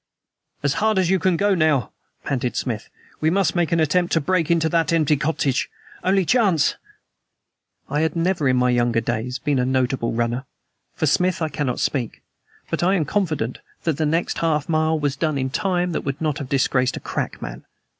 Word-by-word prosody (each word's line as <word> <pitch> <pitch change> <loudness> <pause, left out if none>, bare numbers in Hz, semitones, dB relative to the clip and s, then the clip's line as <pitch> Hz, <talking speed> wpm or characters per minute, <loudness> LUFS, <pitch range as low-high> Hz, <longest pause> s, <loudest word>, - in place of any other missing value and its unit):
"As 145 -1 +2
hard 220 -1 +2
as 185 -1 +2
you 190 - +3
can 180 -1 +2
go 205 +2 +2
now," 155 - +2 0.3
panted 125 -2 -2
Smith. 115 -4 -3 0.3
"We 155 - +2
must 185 0 +1
make 175 -2 +1
an 165 - +2
attempt 175 +3 +2
to 165 - +4
break 165 +1 0
into 165 -1 +3
the 165 0 +2
empty 155 -2 +3
cottage. 145 -3 0 0.3
Only 190 0 +2
chance." 195 - +3 1.1
I 145 - -1
had 160 +1 0
never 165 -3 +1
in 130 - +3
my 125 0 +3
younger 120 -1 +2
days 120 +2 -2
been 140 -2 0
a - - +2
notable 130 -1 0
runner; 120 +3 -1 0.5
for - - 0
Smith 185 0 +2
I 160 -2 -1
cannot 135 -4 -2
speak. 125 -6 -2 0.5
But - - -1
I 185 +3 +3
am 165 -5 +1
confident 155 - -1 0.2
that 160 -4 0
the 155 - +1
next 165 +3 0
half 155 -3 0
mile 155 0 +1
was 145 -2 0
done 155 0 -1
in 130 -1 -2
time 180 +1 0
that - - -2
would 135 +1 -4
not 155 -1 -1
have 140 -3 -6
disgraced 130 -2 +1
a - - -4
crack - - -4
man. - - -7
155 Hz, 195 wpm, -22 LUFS, 130-170 Hz, 1.1 s, to